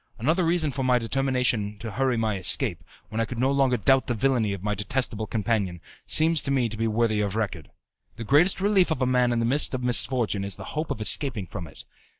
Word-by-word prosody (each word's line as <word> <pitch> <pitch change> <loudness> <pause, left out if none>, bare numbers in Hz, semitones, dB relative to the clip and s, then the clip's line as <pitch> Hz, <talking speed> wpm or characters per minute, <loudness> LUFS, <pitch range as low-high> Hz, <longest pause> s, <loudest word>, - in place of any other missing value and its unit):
Another 160 - 0
reason 165 -3 0
for 135 - -5
my 125 -1 +2
determination 120 -4 -1
to 110 +2 -7
hurry 130 +2 -1
my 110 -2 -1
escape, 95 - 0 0.3
when 110 +1 -3
I - - 0
could 120 - -8
no 130 +3 +1
longer 135 -3 +1
doubt 135 +5 +2
the 120 - -1
villainy 115 -2 0
of 100 -2 -6
my 105 0 -1
detestable 110 +1 -2
companion, 105 -5 -2 0.3
seems 160 0 +4
to 140 - -3
me 130 -4 0
to 110 - -7
be 115 +1 -2
worthy 110 -1 0
of 100 -1 -3
record. 100 -8 -4 0.5
The 115 - -7
greatest 150 - +3
relief 195 -2 +2
of 140 -5 -1
a - - +2
man 125 -1 +1
in 120 - -1
the 115 - 0
midst 135 +2 +2
of 125 - -5
misfortune 120 -4 +3
is 100 -1 -1
the 100 - -10
hope 155 +1 -3
of 110 - -4
escaping 115 -2 +1
from 90 -1 -8
it. 75 - -13
120 Hz, 230 wpm, -25 LUFS, 105-135 Hz, 0.5 s, seems